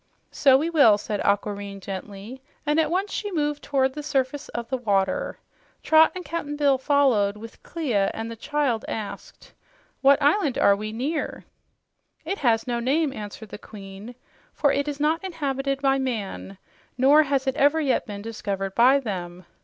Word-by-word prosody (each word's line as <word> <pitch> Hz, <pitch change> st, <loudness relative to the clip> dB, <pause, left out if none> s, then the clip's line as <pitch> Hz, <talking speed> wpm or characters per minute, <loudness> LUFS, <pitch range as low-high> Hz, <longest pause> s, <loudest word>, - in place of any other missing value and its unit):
"So 270 Hz, -2 st, +5 dB
we 320 Hz, +5 st, -1 dB
will," 255 Hz, -10 st, +6 dB
said 210 Hz, 0 st, -4 dB
Aquareine 200 Hz, 0 st, -1 dB
gently, 200 Hz, +6 st, -8 dB, 0.2 s
and 295 Hz, +2 st, +2 dB
at 320 Hz, -, +2 dB
once 380 Hz, +4 st, -1 dB
she 415 Hz, -1 st, -3 dB
moved 295 Hz, -3 st, -1 dB
toward 265 Hz, -2 st, 0 dB
the 300 Hz, -, -6 dB
surface 275 Hz, 0 st, -2 dB
of 235 Hz, -1 st, -5 dB
the 260 Hz, -, -2 dB
water. 200 Hz, -5 st, 0 dB, 0.5 s
Trot 315 Hz, 0 st, +5 dB
and 365 Hz, -1 st, -6 dB
Cap'n 295 Hz, -1 st, -4 dB
Bill 285 Hz, -3 st, +2 dB
followed, 255 Hz, -8 st, +2 dB
with 225 Hz, +1 st, -11 dB
Clia, 240 Hz, -12 st, -1 dB
and 225 Hz, +1 st, -6 dB
the -, -, -6 dB
child 260 Hz, -1 st, -1 dB
asked, 215 Hz, -2 st, -7 dB, 0.5 s
"What 275 Hz, 0 st, +5 dB
island 295 Hz, 0 st, +2 dB
are 200 Hz, -, +5 dB
we 215 Hz, +1 st, -5 dB
near?" 280 Hz, +8 st, -3 dB, 0.8 s
"It 390 Hz, +5 st, -3 dB
has 230 Hz, -4 st, +2 dB
no 240 Hz, -2 st, -2 dB
name," 275 Hz, +4 st, +1 dB
answered 210 Hz, -1 st, -8 dB
the -, -, -9 dB
Queen, 205 Hz, +3 st, -11 dB, 0.4 s
"for 285 Hz, -2 st, +2 dB
it 280 Hz, +1 st, -1 dB
is 290 Hz, -1 st, -4 dB
not 315 Hz, +4 st, +1 dB
inhabited 275 Hz, -6 st, -3 dB
by 270 Hz, 0 st, +3 dB
man, 215 Hz, -6 st, -4 dB, 0.4 s
nor 280 Hz, +4 st, +6 dB
has 275 Hz, -2 st, 0 dB
it 265 Hz, -1 st, 0 dB
ever 290 Hz, +2 st, +3 dB
yet 280 Hz, -5 st, 0 dB
been 205 Hz, -1 st, -7 dB
discovered 195 Hz, -3 st, -4 dB
by 255 Hz, +5 st, +5 dB
them. 180 Hz, -7 st, -6 dB
265 Hz, 170 wpm, -24 LUFS, 210-290 Hz, 0.8 s, will